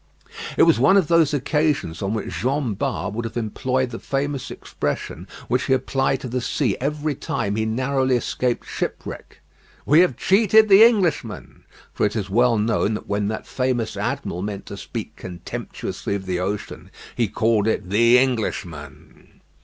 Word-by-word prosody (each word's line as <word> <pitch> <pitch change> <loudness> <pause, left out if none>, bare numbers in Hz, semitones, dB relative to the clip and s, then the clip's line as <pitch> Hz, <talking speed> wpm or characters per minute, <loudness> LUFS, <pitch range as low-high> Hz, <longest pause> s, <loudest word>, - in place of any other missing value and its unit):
It - - +6
was - - +5
one 165 +10 +5
of 185 -6 +2
those 165 -3 +4
occasions 145 - 0
on 100 +2 -1
which 110 - -4
Jean 130 -2 0
Bart 95 -1 -3
would 115 +2 -3
have 115 +1 -5
employed 125 +3 -1
the 115 - -6
famous 140 -1 -3
expression 75 0 -4 0.2
which 125 +1 0
he 135 - +2
applied 135 +1 0
to - - -5
the 125 +1 -2
sea 120 -3 0
every 150 +2 -1
time 100 -6 -3
he 110 0 0
narrowly 130 +3 +1
escaped 125 0 -1
shipwreck. - - -6 0.4
"We 150 +4 +5
have 180 0 +3
cheated 215 +2 +4
the 200 +2 +9
Englishman;" 180 - +1 0.3
for - - -2
it 105 +1 +1
is 100 -3 -3
well 120 +2 +3
known 105 0 +1
that - - -7
when 100 0 -1
that 110 +1 -4
famous 125 -3 -1
admiral 90 - -3
meant 100 0 -5
to - - -7
speak - - -6
contemptuously 90 +2 -5
of 95 -1 -5
the 90 -1 -2
ocean 100 +3 -4 0.3
he 120 -2 +1
called 110 +1 +1
it 100 -4 -1
"the 115 +4 +5
Englishman." 95 - -3
120 Hz, 170 wpm, -22 LUFS, 105-140 Hz, 0.4 s, the